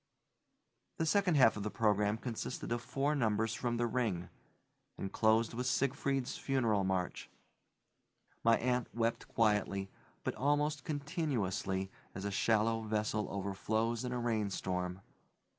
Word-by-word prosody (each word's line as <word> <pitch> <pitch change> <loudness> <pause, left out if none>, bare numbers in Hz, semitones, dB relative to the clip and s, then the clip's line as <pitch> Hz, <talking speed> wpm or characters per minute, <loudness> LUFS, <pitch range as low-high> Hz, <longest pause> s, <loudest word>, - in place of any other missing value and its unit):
The 165 - +1
second 185 0 +3
half 125 -5 +6
of - - -3
the 105 - -2
program 105 -1 +2
consisted 115 -1 -4
of 120 0 0
four 140 +5 0
numbers 110 -4 +1
from 120 +1 -1
the 120 - +1
Ring, 110 -8 -1 0.7
and 95 - -4
closed 110 +1 +3
with 125 +2 -2
Siegfried's 135 0 0
funeral 115 -7 +1
march. 95 -1 -2 1.1
My 115 0 +5
aunt 125 0 0
wept 115 0 0
quietly, 105 -3 +1 0.3
but - - -1
almost 145 +1 +1
continuously, 130 - -1 0.2
as 95 - -5
a 100 - -1
shallow 115 +2 +2
vessel 110 -1 -1
overflows 110 +4 -1
in 125 - -3
a 125 - -1
rainstorm. 95 -5 -1
115 Hz, 130 wpm, -34 LUFS, 105-125 Hz, 1.1 s, half